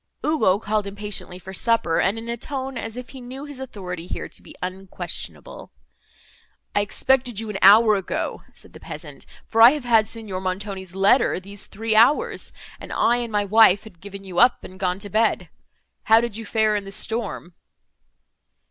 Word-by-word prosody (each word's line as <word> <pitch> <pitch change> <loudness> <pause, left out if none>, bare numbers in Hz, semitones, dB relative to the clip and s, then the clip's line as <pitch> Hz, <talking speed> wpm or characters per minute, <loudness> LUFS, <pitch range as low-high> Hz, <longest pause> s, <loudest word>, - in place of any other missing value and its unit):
Ugo 220 -12 +3
called 210 -1 -2
impatiently 200 -2 -5
for 190 +1 -10
supper, 210 -6 +1
and 200 +4 +1
in 225 +1 -7
a 235 - -2
tone 265 +2 -5
as 225 0 -5
if 250 -1 -8
he 265 - -10
knew 260 +3 -8
his 290 -3 -9
authority 185 -9 -7
here - - -5
to - - -10
be - - -14
unquestionable. 185 +1 -6 1.0
"I 205 - +4
expected 245 +2 0
you 220 -1 -5
an 195 - -5
hour 215 +3 +7
ago," 195 -3 -3
said - - -12
the - - -12
peasant, - - -10 0.2
"for 225 - +1
I 235 +4 +10
have 300 -3 -4
had 225 -3 +3
Signor 210 -5 -4
Montoni's 190 -1 -5
letter 195 +3 +3
these 200 +1 -9
three 220 +1 -2
hours, 295 - +3 0.3
and - - -10
I 240 +1 +2
and 240 -2 -4
my 205 -1 +1
wife 205 -1 +5
had 185 -6 -15
given 200 0 -9
you 185 -2 -4
up, 245 0 +4
and 185 0 -11
gone 180 -1 0
to 200 +1 -7
bed. 220 +2 +1 0.6
How 225 +1 +6
did 235 -2 -3
you 225 -1 -6
fare 215 -1 +2
in 205 - -2
the 195 - -8
storm?" 220 -4 -1
215 Hz, 185 wpm, -23 LUFS, 195-235 Hz, 1.0 s, I